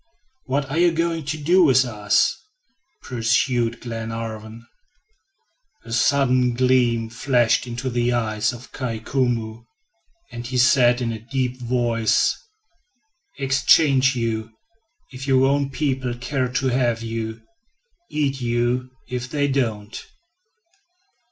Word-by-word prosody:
"What 140 +1 -1
are 160 - 0
you 175 0 +5
going 165 -1 -1
to 155 +2 -3
do 175 +5 +4
with 130 -4 +5
us?" 105 -3 +1 0.7
pursued 120 0 0
Glenarvan. 115 -1 -6 1.2
A 115 - -10
sudden 125 -1 +2
gleam 125 -2 +2
flashed 120 0 +1
into 120 +2 -5
the 120 -1 0
eyes 110 -2 0
of 120 0 -11
Kai 125 -4 -4
Koumou, 115 -2 -2 0.7
and 120 0 -7
he 130 +1 -3
said 125 -1 +4
in 115 -1 -1
a 110 - -5
deep 125 +2 -3
voice: 120 -2 +1 1.0
"Exchange 135 0 +3
you, 115 -2 -2 0.6
if 130 +1 -8
your 135 -1 +4
own 140 0 +1
people 130 -4 -2
care 130 +1 -2
to 130 +1 0
have 120 -2 0
you; 115 0 -4 0.7
eat 140 -3 -1
you 120 +1 0 0.2
if 125 0 -4
they 145 -1 0
don't." 115 -6 -2
125 Hz, 120 wpm, -22 LUFS, 115-135 Hz, 1.2 s, you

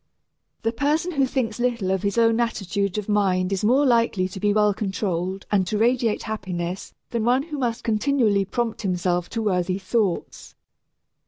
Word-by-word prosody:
The 225 - +1
person 300 +8 0
who 275 -5 +1
thinks 245 -4 -2
little 235 -6 0
of 190 -1 0
his 200 +2 -1
own 230 0 +4
attitude 200 -4 -1
of 210 - -3
mind 195 -3 +1
is 195 +2 -2
more 260 +7 +4
likely 230 -7 +2
to 190 - -8
be 205 +1 +2
well 210 0 +3
controlled 190 -2 -3
and 195 -3 +2
to 210 - -1
radiate 235 0 +1
happiness 185 -4 -4 0.2
than 235 -2 -1
one 250 +4 +3
who 300 -2 -6
must 235 -3 -2
continually 220 -2 +2
prompt 230 +2 -2
himself 180 -2 -1
to 225 -1 -3
worthy 185 -2 0
thoughts. 195 -2 -2
210 Hz, 170 wpm, -23 LUFS, 190-235 Hz, 0.2 s, own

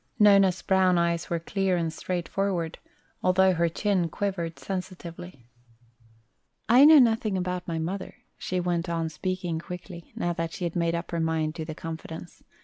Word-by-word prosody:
Nona's 195 -4 +5
brown 185 -2 +3
eyes 170 -1 0
were 170 - 0
clear 190 +2 0
and 165 -2 -1
straightforward, 180 0 -2 0.4
although 185 +1 +4
her 170 -1 +1
chin 185 0 0
quivered 175 -4 -3
sensitively. 180 -6 -7 1.2
"I 250 +5 +7
know 310 +1 +9
nothing 225 -6 +3
about 180 0 -3
my 165 -2 -2
mother," 185 +4 -4 0.2
she 185 - -3
went 175 -1 -1
on 165 -1 -1
speaking 175 +1 -3
quickly, 175 0 -9
now 175 - -1
that 165 -1 -3
she - - -6
had 170 0 -2
made 170 -1 +1
up 170 +1 -5
her 170 - -1
mind 160 -1 0
to 160 - -4
the 155 -1 -6
confidence. 165 +1 -8
175 Hz, 160 wpm, -27 LUFS, 165-190 Hz, 1.2 s, know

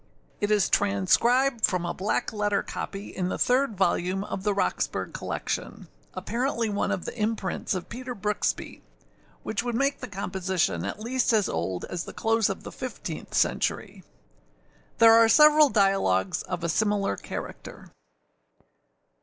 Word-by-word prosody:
It 205 - 0
is 210 -4 +3
transcribed 230 +6 +2
from 180 -2 +2
a 175 - -2
black 200 +3 -2
letter 205 -1 0
copy 195 +1 -6
in 180 -1 -1
the - - -2
third 250 -4 +1
volume 185 +1 +1
of 200 - -5
the 205 +1 +1
Roxburgh 90 - -1
collection, - - -4 0.3
apparently 235 +1 -1
one 205 -1 -1
of 180 - -2
the - - -6
imprints 210 -5 -2
of 180 - -5
Peter 250 +2 -6
Brooksby, 210 0 -2 0.6
which 215 - -2
would 240 -1 -3
make 275 +3 +1
the 255 - -6
composition 190 -3 -2
at - - -5
least 245 +2 0
as 210 -4 +3
old 90 +2 -3
as 175 -1 -5
the - - -9
close 225 -1 +1
of 195 - -5
the - - -8
fifteenth 210 -10 -6
century. - - 0 0.9
There 225 0 +8
are 225 0 +6
several 300 +3 +7
dialogues 195 - +2
of 180 -2 -5
a 170 - -1
similar 205 - +1
character. - - -8
205 Hz, 150 wpm, -26 LUFS, 185-230 Hz, 0.9 s, There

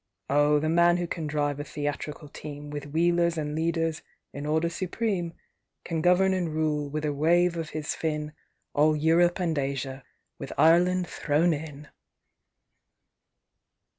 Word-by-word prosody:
Oh, 145 +1 +4
the 150 +2 0
man 170 +2 +4
who 175 - -1
can 165 -2 -4
drive 145 -1 -1
a - - -3
theatrical 150 +1 -5
team, 145 0 -8
With 145 -1 -5
wheelers 170 +2 +2
and 150 -1 -2
leaders 165 0 -1 0.3
in 145 +1 -5
order 160 +2 +1
supreme, 180 0 -2 0.5
Can 165 -2 -2
govern 180 +3 +4
and 180 -3 -1
rule, 150 -2 0
with 155 +1 -3
a 150 - 0
wave 170 +4 +3
of 165 -2 -4
his 155 -1 -3
fin, 150 -1 -3 0.4
All 155 +1 +4
Europe 165 +4 +3
and 170 -3 0
Asia—with 135 -1 -5
Ireland 180 +3 +4
thrown 165 +1 +1
in! 150 -1 -7
155 Hz, 140 wpm, -27 LUFS, 150-170 Hz, 0.5 s, Oh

